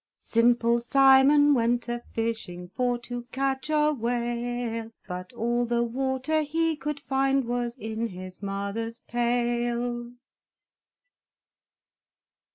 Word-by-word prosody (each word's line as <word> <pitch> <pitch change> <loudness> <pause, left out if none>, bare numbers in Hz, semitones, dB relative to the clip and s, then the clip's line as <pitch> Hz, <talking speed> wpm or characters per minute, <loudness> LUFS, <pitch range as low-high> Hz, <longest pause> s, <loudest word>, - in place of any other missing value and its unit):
Simple 235 0 +3
Simon 275 +3 +6
went 240 -1 +1
a 240 0 -3
fishing 220 -6 -3
For 245 +4 0
to 245 0 -6
catch 270 +1 -1
a 300 0 +3
whale; 240 -1 -2 0.2
But 180 0 -6
all 240 +1 0
the 235 0 +1
water 265 +5 0
he 325 +2 0
could 295 0 -4
find 270 0 +1
Was 240 +1 -2
in 220 0 -3
his 185 -2 -9
mother's 200 +3 -3
pail! 240 0 -1
240 Hz, 105 wpm, -27 LUFS, 230-265 Hz, 0.2 s, Simon